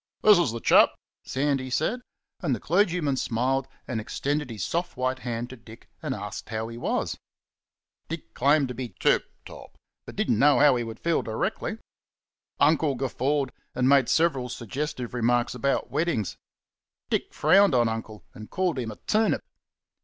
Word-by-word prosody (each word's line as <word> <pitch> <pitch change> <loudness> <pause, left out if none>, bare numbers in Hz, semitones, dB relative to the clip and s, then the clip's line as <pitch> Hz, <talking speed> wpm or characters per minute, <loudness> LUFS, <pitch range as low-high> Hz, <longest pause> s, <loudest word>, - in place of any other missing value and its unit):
"This 210 -3 +7
is 170 -10 +2
the 115 - -4
chap!" - - +5 0.3
Sandy 135 -1 -1
said, 200 - 0 0.4
and 135 - 0
the - - -7
clergyman 170 - +1
smiled 130 +3 0 0.2
and 115 -3 -2
extended 145 +5 -2
his 110 -3 -4
soft 170 -4 -2
white 130 +1 -1
hand 120 0 -4
to - - -8
Dick 115 -1 -15
and - - -2
asked - - -7
how 110 0 -3
he 115 - -8
was. - - -2 0.9
Dick 165 0 -7
claimed 140 +1 +3
to - - -4
be 125 -1 -6
"tip - - +3 0.2
top," - - -12 0.3
but - - -9
didn't 110 - +1
know 145 +2 +5
how 145 -3 +6
he 120 - -1
would 115 -1 -7
feel 170 -1 +1
directly. 110 -1 -3 0.8
Uncle 150 -1 +3
guffawed 135 +1 -1 0.2
and 125 0 +2
made 135 -2 +5
several 145 -7 +2
suggestive 125 +1 -4
remarks 120 0 +1
about 125 0 -1
weddings. 145 - -1 0.8
Dick - - 0
frowned 195 -6 +4
on 120 -1 +4
Uncle 110 -1 -5
and 110 0 -10
called 180 -7 0
him 120 -3 -3
a 110 - -7
turnip. 220 +1 +2
130 Hz, 165 wpm, -26 LUFS, 120-150 Hz, 0.9 s, This